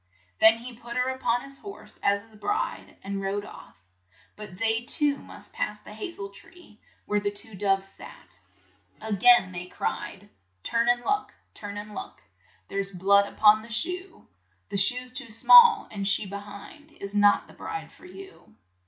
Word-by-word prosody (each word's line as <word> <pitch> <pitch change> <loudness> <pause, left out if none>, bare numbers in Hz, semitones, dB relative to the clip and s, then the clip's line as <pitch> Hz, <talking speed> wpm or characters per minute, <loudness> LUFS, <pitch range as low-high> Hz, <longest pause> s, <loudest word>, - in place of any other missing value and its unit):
Then 220 +1 +7
he 240 +1 -10
put 235 +1 -8
her 250 +1 +1
up 260 0 -9
on 240 0 +1
his 275 0 -7
horse 400 -1 -12
as 200 0 +1
his 225 -1 -21
bride, 415 - -3
and 195 0 -4
rode 200 +1 -3
off. - - -14 0.5
But 210 -4 -10
they 225 +1 +1
too 285 +3 +2
must - - -7
pass - - -3
the - - -13
ha 400 - -6
zel 200 -12 -8
tree, 215 - -17 0.3
where 210 0 0
the 205 0 -1
two 205 +2 -3
doves 195 0 0
sat. - - -13 0.6
A 220 -1 -4
gain 200 -1 +5
they 180 0 -7
cried, 190 +2 -5 0.4
"Turn 235 +1 +1
and 240 0 +3
look, 410 +1 -1 0.2
turn 205 -1 -8
and 210 0 -8
look, - - -8
■ - - -26 0.5
There's 195 0 -2
blood 200 +2 +3
up - - -19
on 215 0 +7
the 230 - -13
shoe; 360 - -2 0.4
The - - -3
shoe's 250 +6 +2
too 260 -3 -6
small, 470 - +7
and 200 -2 -3
she 200 +1 +2
be 200 +1 -8
hind 205 +10 -12
Is 200 -7 -8
not 205 0 +4
the - - -17
bride 415 -1 -7
for 365 - -16
you." 385 - -14
220 Hz, 190 wpm, -26 LUFS, 200-260 Hz, 0.6 s, Then